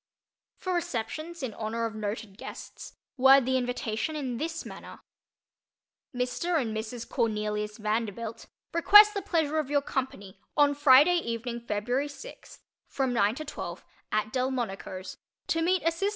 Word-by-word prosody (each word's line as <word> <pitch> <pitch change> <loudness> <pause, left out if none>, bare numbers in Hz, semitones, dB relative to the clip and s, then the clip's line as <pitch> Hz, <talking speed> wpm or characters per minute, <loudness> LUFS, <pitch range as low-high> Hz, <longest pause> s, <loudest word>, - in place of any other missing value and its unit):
For 370 - -3
receptions 335 0 -3
in 240 -4 -3
honor 225 +2 -3
of 225 - -3
noted 210 -1 -5
guests, - - -9 0.2
word 270 0 +7
the 260 +1 +1
invitation 245 +2 -2
in 260 -5 -3
this 325 +4 -4
manner: - - -10 1.1
MR. 255 +7 -1
AND 225 -5 -2
MRS. 225 +2 -5
CORNELIUS 210 -1 -1
VANDERBILT 220 +1 -3 0.3
request 415 +5 +8
the 400 - -2
pleasure 315 -4 0
of 295 -3 -3
your 285 -1 +2
company 230 -9 -4 0.2
on 290 -1 +5
Friday 290 +4 +6
evening 235 -3 -4
February 235 +5 -1
sixth 370 - -12 0.2
from 265 -3 -1
nine 215 -1 +2
to 310 - -6
twelve 290 - -7 0.3
AT 215 0 -1
DELMONICO'S 240 -7 -3 0.3
to 330 - 0
meet 365 +2 +2
Asst. 330 +3 0
250 Hz, 140 wpm, -28 LUFS, 220-310 Hz, 1.1 s, request